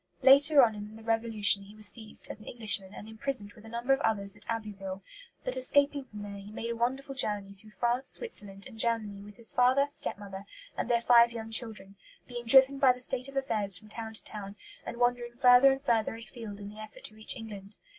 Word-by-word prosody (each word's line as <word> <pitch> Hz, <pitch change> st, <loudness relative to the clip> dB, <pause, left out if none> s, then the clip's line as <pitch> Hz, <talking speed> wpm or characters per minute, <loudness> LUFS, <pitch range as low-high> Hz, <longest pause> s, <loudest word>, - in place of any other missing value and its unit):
Later 280 Hz, +1 st, +7 dB
on 225 Hz, -2 st, +2 dB
in 210 Hz, +1 st, -9 dB
the 225 Hz, -, -13 dB
Revolution 225 Hz, -3 st, +3 dB
he 200 Hz, +2 st, -14 dB
was 215 Hz, -1 st, +5 dB
seized, 220 Hz, -2 st, +1 dB
as -, -, -10 dB
an 215 Hz, -, -15 dB
Englishman, 210 Hz, -5 st, -3 dB
and 210 Hz, -, -10 dB
imprisoned 220 Hz, -2 st, -4 dB
with 215 Hz, -, -17 dB
a -, -, -11 dB
number 235 Hz, +4 st, 0 dB
of 270 Hz, -, 0 dB
others 200 Hz, -2 st, -2 dB
at 205 Hz, -, -11 dB
Abbeville; 200 Hz, -4 st, -5 dB, 0.4 s
but, -, -, 0 dB
escaping 285 Hz, -, +2 dB
from 210 Hz, -4 st, -10 dB
there, 200 Hz, -1 st, -8 dB
he 200 Hz, +1 st, -11 dB
made 230 Hz, +2 st, -5 dB
a -, -, -3 dB
wonderful 265 Hz, +4 st, -2 dB
journey 205 Hz, -6 st, 0 dB
through 210 Hz, +2 st, -12 dB
France, 240 Hz, +4 st, -2 dB
Switzerland, 200 Hz, -, -4 dB
and 225 Hz, -4 st, -12 dB
Germany 220 Hz, -4 st, -1 dB
with 205 Hz, 0 st, -13 dB
his 235 Hz, -1 st, -1 dB
father, 255 Hz, +3 st, +3 dB
step 285 Hz, -, -1 dB
mother, 200 Hz, -1 st, -9 dB, 0.3 s
and -, -, -4 dB
their 235 Hz, -1 st, +2 dB
five 235 Hz, 0 st, +5 dB
young 225 Hz, -1 st, -7 dB
children; 210 Hz, -4 st, -3 dB, 0.3 s
being 240 Hz, -1 st, -7 dB
driven 270 Hz, +2 st, +6 dB
by 270 Hz, -2 st, +6 dB
the 250 Hz, -, -6 dB
state 255 Hz, +1 st, -2 dB
of 275 Hz, -, -8 dB
affairs 210 Hz, -8 st, 0 dB
from 215 Hz, +2 st, -14 dB
town 220 Hz, 0 st, -6 dB
to -, -, -9 dB
town, 205 Hz, -2 st, -7 dB, 0.3 s
and 235 Hz, -, -6 dB
wandering 245 Hz, 0 st, -1 dB
further 250 Hz, +1 st, +7 dB
and 270 Hz, +1 st, -3 dB
further 225 Hz, -4 st, 0 dB
afield 225 Hz, -2 st, -10 dB
in 200 Hz, 0 st, -8 dB
the 210 Hz, +1 st, -13 dB
effort 215 Hz, 0 st, -11 dB
to -, -, -11 dB
reach 220 Hz, 0 st, +1 dB
England. 210 Hz, -3 st, -9 dB
225 Hz, 225 wpm, -29 LUFS, 205-245 Hz, 0.4 s, Later